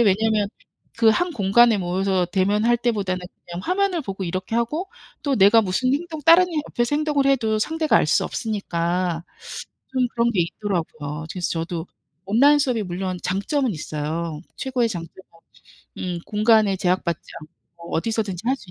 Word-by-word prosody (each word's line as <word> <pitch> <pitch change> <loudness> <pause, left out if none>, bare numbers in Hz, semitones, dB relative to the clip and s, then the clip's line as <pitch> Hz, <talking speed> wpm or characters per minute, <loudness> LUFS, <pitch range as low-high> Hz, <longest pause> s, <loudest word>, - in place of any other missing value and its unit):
왜냐면 215 -1 +2 0.5
그 225 -1 +6
한 355 +9 +1
공간에 230 - +4
모여서 185 0 0
대면할 205 +6 +2
때보다 210 -6 0
는 - - -6 0.2
그냥 175 +1 -6
화면을 370 -2 0
보고 195 -7 -5
이렇게 185 +5 -4
하고 300 +11 -1 0.3
또 285 -2 +1
내가 205 +3 +6
무슨 220 +6 0
행동 315 +1 -3
다른 340 +2 +7
이 330 - -5
옆에서 240 +4 0
행동을 295 -3 +1
해도 225 -6 +2
상대가 315 +7 +1
알 - - +3
수 - - +2
없으니까 175 -5 -2 0.7
좀 255 -1 +2
그런 235 0 +2
게 195 - +1
있더라고요. 160 -5 -4
그래서 180 -2 -3
저도 165 0 -3 0.4
온라인 275 +8 +5
수업이 250 -6 0
물론 185 +1 -3
장점은 235 - 0
있어요. 155 +1 -4 0.2
최고의 255 -3 0
장점은 175 -2 -7 0.8
음 180 -2 -3
공간에 215 -2 +3
제약받지 180 -3 0 0.2
않고 170 +2 -12
어디서든지 210 -1 -2
할 265 +2 +2
수 190 - -15
210 Hz, 345 characters per minute, -23 LUFS, 180-250 Hz, 0.8 s, 다른